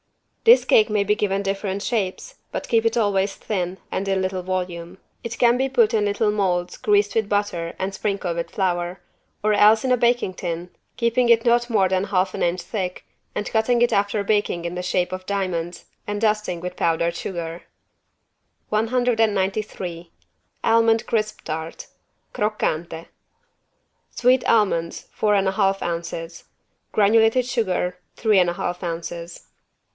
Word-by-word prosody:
This 475 +2 +7
cake 215 +1 +4
may 210 -1 +1
be 205 +1 +2
given 200 -2 -1
different 195 0 -2
shapes, 225 - -2 0.2
but - - -4
keep 230 -2 +2
it 230 +1 +1
always 200 -3 +1
thin 185 -3 -3
and 195 - -2
in 195 -1 +1
little 185 0 -2
volume. 180 -1 -4 0.3
It 230 0 -5
can 240 -1 +4
be 265 +2 0
put 235 -4 +3
in 215 -2 +2
little 205 +1 +1
molds 180 -4 0
greased 205 -1 +2
with 220 -2 0
butter 205 -5 -1
and 190 +1 -3
sprinkled 195 -4 -2
with 170 - -3
flour, 180 -1 -1 0.4
or 215 0 +3
else 215 +3 +5
in 255 - +1
a 250 - +4
baking 240 -5 +1
tin, 175 -1 -5 0.3
keeping 235 +1 +2
it 230 0 +5
not 240 0 +3
more 205 -5 +3
than 190 +1 0
half 185 -1 0
an - - -5
inch 175 +1 0
thick, 185 -5 -4 0.3
and 210 - -2
cutting 235 +2 +2
it 240 - +2
after 200 0 +1
baking 205 -5 0
in 170 - -3
the 180 - -3
shape 180 0 0
of 185 0 -6
diamonds 180 -4 -3 0.2
and 205 0 -2
dusting 210 -5 0
with 180 +1 -6
powdered 170 0 0
sugar. 170 -2 -5 1.1
193 215 -6 0 0.5
ALMOND 225 0 +3
CRISP 215 -2 -1
TART 160 +1 -5 0.5
(Croccante) 170 -6 -2 1.0
Sweet 250 +1 +2
almonds, 190 -7 +1
four 210 -1 +1
and 195 -1 +2
a - - +2
half 195 0 +1
ounces. 170 0 -5 0.5
Granulated 225 +4 +4
sugar, 185 -7 -1 0.2
three 215 -4 +3
and 180 -1 +3
a - - -2
half 175 +1 -4
ounces. 170 0 -6
200 Hz, 160 wpm, -22 LUFS, 180-220 Hz, 1.1 s, This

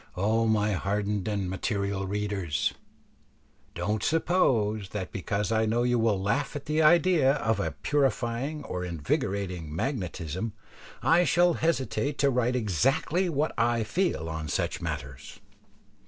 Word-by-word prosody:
O 110 +4 +2
my 105 -1 +2
hardened 100 +1 -1
and 100 -3 -1
material 100 +1 -2
readers! 100 -7 -1 1.0
don't 105 0 -1
suppose 115 - +1
that 95 -2 -5
because 100 +1 -2
I 110 0 +2
know 115 +2 +1
you 120 -1 +2
will 110 -4 +2
laugh 135 +11 -1
at 145 - -5
the 155 +1 +1
idea 160 -3 +5
of 110 -7 0
a 80 -6 -1
purifying 135 +1 0
or 90 -7 -4
invigorating 90 0 -2
magnetism 95 - -3 0.5
I 170 +2 +5
shall 175 0 +4
hesitate 145 -3 -1
to 140 -1 +3
write 125 0 +1
exactly 135 - +1
what 155 0 0
I 115 -1 +2
feel 170 - -1
on 80 -1 -4
such 70 - -2
matters. 65 -1 -6
110 Hz, 135 wpm, -28 LUFS, 95-140 Hz, 1.0 s, idea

